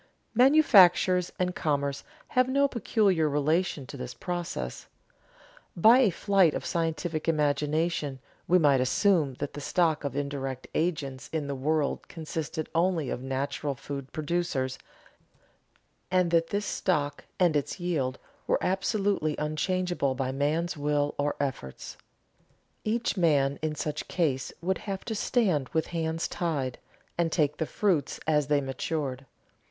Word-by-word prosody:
Manufactures 200 - +5
and 180 0 0
commerce 140 -2 -1 0.3
have 255 0 +2
no 280 +1 +3
peculiar 200 - +1
relation 150 +1 0
to 140 - -9
this 125 -1 -6
process. 175 - -4 0.9
By 225 +8 +7
a 250 -6 +5
flight 190 -2 +3
of - - -4
scientific 165 -1 -2
imagination 150 -1 0 0.3
we 180 - +5
might 145 -6 +4
assume 150 +1 +2
that 145 +2 -5
the 145 - -6
stock 160 0 +1
of 140 -2 -3
indirect 140 -2 -3
agents 155 -6 -2
in 160 -2 -2
the 140 - -3
world 145 +2 -1
consisted 160 -1 -4
only 165 -4 +1
of 125 - -3
natural 140 +2 -2
food 140 0 -7
producers, 155 -5 -2 1.3
and 180 -2 +2
that 165 -1 +3
this 205 +3 -2
stock 145 -6 -1
and 175 -4 +3
its 145 +6 -1
yield 150 -8 -1 0.3
were - - +3
absolutely 195 -4 0
unchangeable 155 -1 -1
by 130 0 -1
man's 155 +6 0
will 145 0 0
or 145 +1 0
efforts. 130 - -4 0.9
Each 225 -1 -1
man 140 -5 +2
in 155 -1 -2
such 150 0 -4
case 140 -7 0
would 190 +2 0
have 195 -2 -5
to 225 - -3
stand 190 - +1
with 160 -1 +1
hands 165 0 -1
tied, 145 -8 -2 0.4
and 165 -1 +2
take 150 -3 +1
the 160 - -2
fruits 180 -10 0
as 150 -2 +2
they 145 -1 +2
matured. 135 0 -3
155 Hz, 135 wpm, -28 LUFS, 140-180 Hz, 1.3 s, By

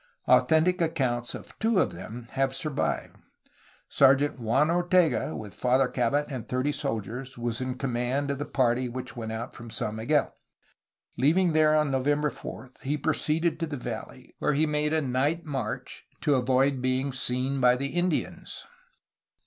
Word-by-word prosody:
Authentic 170 +3 +4
accounts 130 -7 0
of - - -12
two 220 -3 +2
of - - +2
them 110 +7 -8
have 135 0 0
survived. 150 -2 -2 0.7
Sergeant 140 0 +4
Juan 130 +7 +2
Ortega, 175 -7 +2
with 105 -2 -8
Father 130 +1 +2
Cabot 125 +4 +1
and 130 -5 -6
thirty 130 +3 0
soldiers, 125 0 -4
was 120 0 -3
in 130 0 -3
command 130 +2 -1
of 140 - -3
the 145 - -3
party 125 -1 +1
which 125 +1 -6
went 110 -2 -5
out 110 +1 -5
from 120 -1 -10
San 110 0 -3
Miguel. 140 +6 +1 0.8
Leaving 165 +6 +3
there 155 0 +4
on 150 -2 +2
November 145 +2 +1
4 130 - -9
he 145 +3 -1
proceeded 160 +2 0
to 165 - -1
the 145 -2 -4
valley, 120 +1 -7
where 150 - +1
he 150 +3 +3
made 150 0 0
a 160 0 +2
night 140 +6 0
march 135 -8 -4 0.2
to 145 - +2
avoid 130 +1 +2
being 130 +1 0
seen 130 +1 -1
by 125 0 +6
the 140 +2 -3
Indians. 175 0 -2
135 Hz, 160 wpm, -27 LUFS, 125-150 Hz, 0.8 s, by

